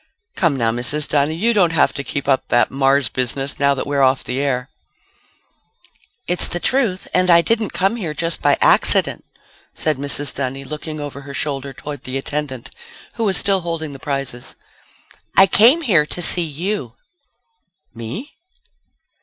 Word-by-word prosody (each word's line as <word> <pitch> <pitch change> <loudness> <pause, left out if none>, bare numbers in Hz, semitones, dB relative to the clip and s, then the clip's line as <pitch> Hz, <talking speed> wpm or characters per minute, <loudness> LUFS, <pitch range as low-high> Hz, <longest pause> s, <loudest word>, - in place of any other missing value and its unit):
"Come, 165 -6 +1
now, 115 -3 0
Mrs. 125 +6 -3
Dunny. 145 +2 0
You 225 +8 +1
don't 180 -6 +2
have - - +2
to 140 - -5
keep 140 0 -4
up 135 -2 +1
that 120 - +2
Mars 135 0 +2
business 135 +3 -2
now 140 0 +2
that 130 - -4
we're 140 -1 -1
off 130 0 +2
the 125 +1 -4
air." 130 -3 -1 1.6
"It's 180 0 0
the 175 - -3
truth 225 -5 0
and 185 0 +2
I 170 -1 +7
didn't 225 +1 0
come 195 +5 0
here 165 -9 -5
just 165 +1 -1
by 145 -1 +3
accident," - - +4 0.5
said 155 -3 -1
Mrs. 140 0 -1
Dunny, 135 0 -4
looking 155 +2 -7
over 145 -1 -7
her 140 0 -9
shoulder 140 -2 -3
toward 145 0 -9
the 130 +1 -3
attendant 135 -3 -5 0.4
who 230 - -2
was 195 -3 +2
still 195 -2 +1
holding 165 -3 -4
the 135 - -10
prizes. 135 -3 -5 0.8
"I 195 - +8
came 235 - +6
here 175 - +2
to 175 - -4
see 175 - +6 0.2
you." 140 - -3 1.0
"Me?" 115 - -7
145 Hz, 165 wpm, -19 LUFS, 135-175 Hz, 1.6 s, I